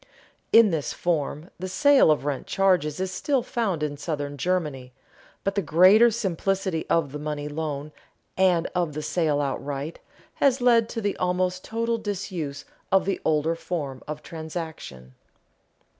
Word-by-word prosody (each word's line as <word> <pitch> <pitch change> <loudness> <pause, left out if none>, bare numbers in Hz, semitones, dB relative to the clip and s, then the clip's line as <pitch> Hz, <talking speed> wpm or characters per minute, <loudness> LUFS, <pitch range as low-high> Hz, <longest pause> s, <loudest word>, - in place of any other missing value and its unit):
In 225 -3 +7
this 155 -4 -2
form, 160 -1 -2
the 185 - -4
sale 285 - +5
of 150 -2 +2
rent 145 -2 -3
charges 180 -6 +2
is 190 0 -2
still 255 +7 0
found 215 - -1
in 145 -1 -2
southern 145 -2 -4
Germany, 145 -6 -2 0.5
but 195 - 0
the 200 - 0
greater 185 +8 +6
simplicity 195 -4 -1
of 155 -5 +1
the 150 - -6
money 150 -1 -4
loan, 150 -1 -4 0.4
and 180 -3 +3
of 175 -4 -1
the 155 +1 -4
sale 155 -4 +1
outright, 140 +2 -3 0.4
has 270 -2 +3
led 235 -2 +4
to 225 - -4
the 205 -1 -1
almost 180 0 0
total 230 +1 -1
disuse 180 -9 -4 0.3
of 190 0 +4
the 195 - -1
older 155 +1 +1
form 150 -6 -4
of 150 0 -6
transaction. 160 - -7
170 Hz, 150 wpm, -25 LUFS, 150-195 Hz, 0.5 s, In